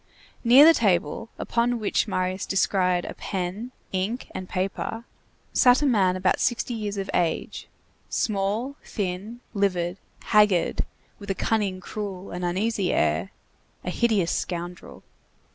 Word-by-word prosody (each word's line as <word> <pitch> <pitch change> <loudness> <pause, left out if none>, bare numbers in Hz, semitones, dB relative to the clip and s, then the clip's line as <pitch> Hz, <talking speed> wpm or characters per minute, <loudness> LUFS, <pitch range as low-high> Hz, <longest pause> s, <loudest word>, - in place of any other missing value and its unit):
Near 255 +5 +8
the 330 - +9
table, 200 - +1
upon 240 +1 0
which 215 0 0
Marius 185 -1 -1
descried 185 -2 +2
a - - -5
pen, 195 +5 -4 0.2
ink, 195 +7 -2
and 185 - -6
paper, 195 +4 -3 0.5
sat 250 +3 +5
a - - +3
man 195 -8 +3
about 185 0 +1
sixty 240 -1 0
years 210 -3 -3
of 195 0 -3
age, 170 -2 -1 0.4
small, 215 +6 -1
thin, 205 +4 -4
livid, 185 -3 0 0.3
haggard, 210 -5 +3 0.3
with 200 0 -10
a 195 - 0
cunning, 200 -4 0
cruel, 195 -2 -6
and 180 +1 -5
uneasy 190 +2 0
air; 80 +4 +1 0.5
a 180 - -3
hideous 210 -6 +2
scoundrel. 175 0 -5
195 Hz, 130 wpm, -25 LUFS, 180-225 Hz, 0.5 s, the